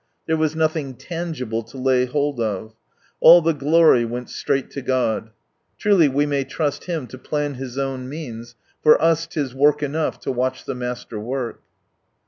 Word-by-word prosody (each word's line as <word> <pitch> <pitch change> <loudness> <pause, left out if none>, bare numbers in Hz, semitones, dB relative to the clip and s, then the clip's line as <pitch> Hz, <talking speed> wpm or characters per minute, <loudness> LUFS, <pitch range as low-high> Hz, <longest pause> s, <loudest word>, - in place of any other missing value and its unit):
There 160 - +1
was 155 -1 0
nothing 155 -4 -1
tangible 155 -8 -4
to 115 +4 -13
lay 130 -1 +2
hold 145 0 -1
of. 110 -1 -3 0.5
All 170 +2 +9
the 165 0 +1
glory 150 -2 +4
went 120 +1 -5
straight 135 -1 -1
to 140 - -5
God. 125 -4 0 0.5
Truly 195 -7 +4
we 140 +2 +1
may 140 -2 0
trust 145 +2 -3
Him 165 -6 -3
to 130 +1 -11
plan 145 +1 -2
His 130 -1 -7
own 135 -2 -3
means, 120 -6 -8 0.3
for 155 - +6
us 165 0 +2
'tis 140 -6 -3
"work 145 +2 +3
enough 150 +2 -1
to - - -2
watch 130 +1 -2
the - - -3
Master 125 -3 -5
work." 120 +2 -4
135 Hz, 170 wpm, -22 LUFS, 125-155 Hz, 0.5 s, All